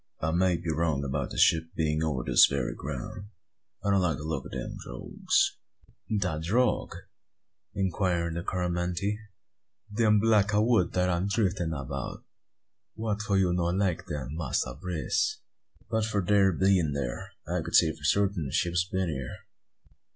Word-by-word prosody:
"I 80 Hz, -, 0 dB
may 90 Hz, +1 st, +2 dB
be 85 Hz, -1 st, -3 dB
wrong 80 Hz, -3 st, 0 dB
about 70 Hz, -1 st, -2 dB
the -, -, -7 dB
ship 80 Hz, 0 st, +4 dB
being 80 Hz, -1 st, 0 dB
over 70 Hz, -6 st, -1 dB
this -, -, +7 dB
very 70 Hz, -3 st, -2 dB
ground. 70 Hz, +7 st, -6 dB, 0.6 s
I 100 Hz, -, +1 dB
don't 100 Hz, -1 st, +4 dB
like 85 Hz, -4 st, +1 dB
the 75 Hz, -, -7 dB
look 75 Hz, -4 st, -3 dB
o' -, -, -12 dB
them -, -, -5 dB
drogues." -, -, 0 dB, 0.6 s
"De 90 Hz, -6 st, -1 dB
drogue?" 115 Hz, +10 st, +1 dB, 0.8 s
inquired 90 Hz, -3 st, 0 dB
the 85 Hz, -, -3 dB
Coromantee. 90 Hz, +3 st, -1 dB, 0.8 s
"Dem 105 Hz, -2 st, +4 dB
block 105 Hz, -1 st, +3 dB
o' 105 Hz, -, +4 dB
wood 110 Hz, -7 st, +2 dB
dat 90 Hz, 0 st, +2 dB
am 90 Hz, +2 st, 0 dB
driffin' 95 Hz, -4 st, 0 dB
about? 70 Hz, -2 st, -5 dB, 0.7 s
Wha' 110 Hz, -1 st, -1 dB
for 105 Hz, -2 st, 0 dB
you 90 Hz, -2 st, +3 dB
no 90 Hz, -1 st, 0 dB
like 90 Hz, 0 st, 0 dB
dem, 75 Hz, -6 st, -4 dB
Massa 70 Hz, -5 st, -2 dB
Brace?" 90 Hz, -, -1 dB, 0.5 s
"But 110 Hz, -1 st, 0 dB
for 105 Hz, -3 st, -1 dB
their 100 Hz, 0 st, +4 dB
bein' 90 Hz, -5 st, +2 dB
thear -, -, -3 dB, 0.2 s
I -, -, -1 dB
could -, -, -3 dB
say -, -, +6 dB
for -, -, -13 dB
sartin 100 Hz, -6 st, +1 dB
a -, -, -8 dB
ship 85 Hz, +5 st, 0 dB
had 90 Hz, +3 st, 0 dB
been 95 Hz, -2 st, 0 dB
here." 65 Hz, -4 st, -4 dB
90 Hz, 165 wpm, -28 LUFS, 80-100 Hz, 0.8 s, this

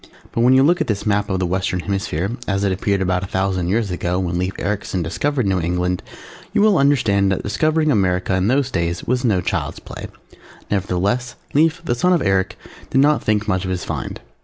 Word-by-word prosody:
But 115 Hz, -, -1 dB
when 125 Hz, +2 st, +5 dB
you 130 Hz, -, +6 dB
look 175 Hz, +5 st, +3 dB
at -, -, 0 dB
this 105 Hz, -1 st, -2 dB
map 105 Hz, -1 st, +1 dB
of 95 Hz, -, 0 dB
the 95 Hz, -, 0 dB
Western 90 Hz, 0 st, -1 dB
Hemisphere 95 Hz, -1 st, -2 dB, 0.2 s
as 100 Hz, 0 st, 0 dB
it 100 Hz, -, +2 dB
appeared 95 Hz, +1 st, 0 dB
about 90 Hz, -1 st, 0 dB
a -, -, -4 dB
thousand 95 Hz, -2 st, -1 dB
years 105 Hz, 0 st, 0 dB
ago, 90 Hz, 0 st, -1 dB
when 90 Hz, -2 st, -1 dB
Lief 95 Hz, +1 st, -2 dB
Ericsen 95 Hz, -2 st, -2 dB
discovered 130 Hz, -, -1 dB
New 95 Hz, -1 st, +1 dB
England, 90 Hz, +1 st, -1 dB, 0.5 s
you -, -, +3 dB
will 210 Hz, -2 st, +4 dB
understand 110 Hz, -9 st, +3 dB
that 95 Hz, -, -1 dB
discovering 155 Hz, +10 st, +1 dB
America 95 Hz, -4 st, +1 dB
in 95 Hz, +1 st, +1 dB
those 130 Hz, +2 st, +1 dB
days 85 Hz, -4 st, -1 dB
was 125 Hz, +1 st, 0 dB
no 105 Hz, -7 st, +2 dB
child's -, -, -2 dB
play. -, -, -8 dB, 0.6 s
Nevertheless, 100 Hz, +6 st, 0 dB, 0.2 s
Lief, 160 Hz, +3 st, +2 dB
the 120 Hz, -, +1 dB
son 180 Hz, +10 st, +2 dB
of 175 Hz, -, +2 dB
Eric, 95 Hz, -1 st, +1 dB, 0.3 s
did -, -, 0 dB
not 145 Hz, +2 st, +3 dB
think 105 Hz, 0 st, +1 dB
much 95 Hz, -3 st, 0 dB
of 95 Hz, -, -4 dB
his 90 Hz, -1 st, -2 dB
find. -, -, -4 dB
100 Hz, 210 wpm, -20 LUFS, 90-125 Hz, 0.6 s, you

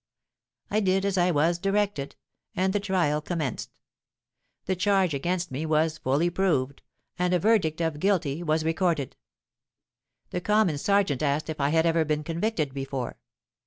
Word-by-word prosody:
'—I 215 Hz, -, +2 dB
did 195 Hz, -1 st, +1 dB
as 200 Hz, -1 st, 0 dB
I 180 Hz, -1 st, +3 dB
was 170 Hz, +2 st, +2 dB
directed; 195 Hz, -6 st, -1 dB, 0.4 s
and 190 Hz, +1 st, +1 dB
the 205 Hz, -, +1 dB
trial 180 Hz, -7 st, 0 dB
commenced. 155 Hz, -5 st, -4 dB, 0.9 s
The 190 Hz, -, 0 dB
charge 190 Hz, -2 st, +2 dB
against 175 Hz, +5 st, -2 dB
me 135 Hz, +4 st, -3 dB
was 155 Hz, 0 st, +1 dB
fully 145 Hz, +7 st, +1 dB
proved; 140 Hz, -8 st, 0 dB, 0.4 s
and 180 Hz, 0 st, +2 dB
a -, -, +2 dB
verdict 170 Hz, -6 st, +2 dB
of 160 Hz, -3 st, -1 dB
Guilty 170 Hz, -5 st, 0 dB
was 155 Hz, -1 st, 0 dB
recorded. 160 Hz, -4 st, 0 dB, 1.2 s
The 180 Hz, -, -2 dB
Common 205 Hz, -6 st, +2 dB
Serjeant 200 Hz, -7 st, +1 dB
asked 150 Hz, +2 st, 0 dB
if 155 Hz, -, -5 dB
I 140 Hz, -, +2 dB
had 160 Hz, +2 st, +2 dB
ever 165 Hz, -1 st, +3 dB
been 150 Hz, -1 st, -1 dB
convicted 165 Hz, -3 st, -2 dB
before. 135 Hz, -2 st, -4 dB
165 Hz, 155 wpm, -26 LUFS, 150-190 Hz, 1.2 s, I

